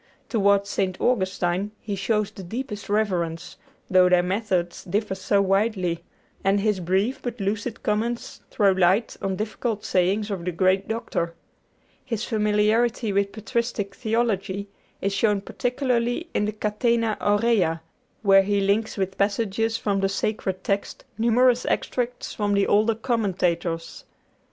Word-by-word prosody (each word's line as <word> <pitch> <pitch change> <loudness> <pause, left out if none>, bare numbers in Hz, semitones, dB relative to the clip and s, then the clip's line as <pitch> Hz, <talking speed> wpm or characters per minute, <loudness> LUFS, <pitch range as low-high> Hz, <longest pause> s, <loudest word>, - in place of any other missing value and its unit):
Toward 200 -3 +3
St. 190 -2 -2
Augustine 190 -3 0
he 205 -2 -4
shows 210 +1 0
the - - -10
deepest 210 +2 -6
reverence, 180 -6 -1 0.3
though 185 -1 +5
their 180 -1 +4
methods 185 -2 -1
differ 200 +2 -1
so 200 +1 +1
widely, 190 -4 0 0.4
and 195 +1 +3
his 210 -1 +1
brief 190 +8 0
but 245 -1 -5
lucid 210 +3 -3
comments 230 +3 -2
throw 200 -3 +3
light 190 +4 +2
on 195 -1 -1
difficult 215 +1 -3
sayings 195 +4 +1
of 190 -4 -3
the 180 - -1
great 185 +3 +2
Doctor. 220 -7 -2 0.7
His 230 -3 -3
familiarity 215 +1 +1
with 200 0 +1
patristic 220 -2 -2
theology 205 -4 -1 0.3
is 195 0 0
shown 205 0 +2
particularly 245 - -1
in 210 - +1
the 210 - -1
'Catena 215 +1 0
Aurea,' 205 -6 +2 0.4
where 195 -1 +7
he 200 +1 +1
links 200 +3 +1
with 190 -1 -2
passages 220 +2 0
from 200 -2 0
the 195 0 +1
Sacred 195 -2 -2
Text 200 0 -2
numerous 245 +2 +4
extracts 245 0 -2
from 205 -1 0
the 200 - +3
older 215 +2 +3
commentators. 180 -8 -1
205 Hz, 135 wpm, -24 LUFS, 190-225 Hz, 0.7 s, where